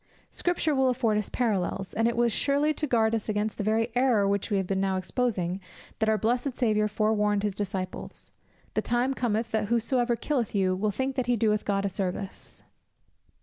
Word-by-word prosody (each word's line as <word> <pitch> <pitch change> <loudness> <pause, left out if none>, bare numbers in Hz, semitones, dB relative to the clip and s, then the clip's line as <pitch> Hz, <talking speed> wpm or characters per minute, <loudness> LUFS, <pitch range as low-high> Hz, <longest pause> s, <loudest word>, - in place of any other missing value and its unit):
Scripture 350 -3 0
will 265 -1 +3
afford 235 -4 +1
us 210 - -4
parallels; 195 -5 -1
and 225 +1 +2
it 235 - 0
was 235 -2 +3
surely 290 +2 +2
to 300 0 -2
guard 225 -3 +2
us 225 -1 -2
against 210 0 -1
the - - 0
very 225 +3 +1
error 245 -5 +3
which 200 +1 0
we 205 - +1
have 190 - 0
been 190 +1 -1
now 190 -1 +1
exposing, 185 -3 -1 0.4
that 220 -1 +2
our 220 - +3
blessed 245 +4 0
Saviour 215 -3 +2
forewarned 210 -1 +1
his 205 -2 0
disciples: 190 -2 -5 0.4
"The - - +1
time 245 +3 +1
cometh, 230 -3 -1
that 220 -1 0
whosoever 235 +1 +1
killeth 235 -3 -2
you 185 -2 +2
will 210 +3 0
think 260 +6 -2
that 255 - 0
he 245 - +3
doeth 215 -1 +1
God 200 -1 0
service." 190 +1 -5
220 Hz, 190 wpm, -27 LUFS, 200-245 Hz, 0.4 s, will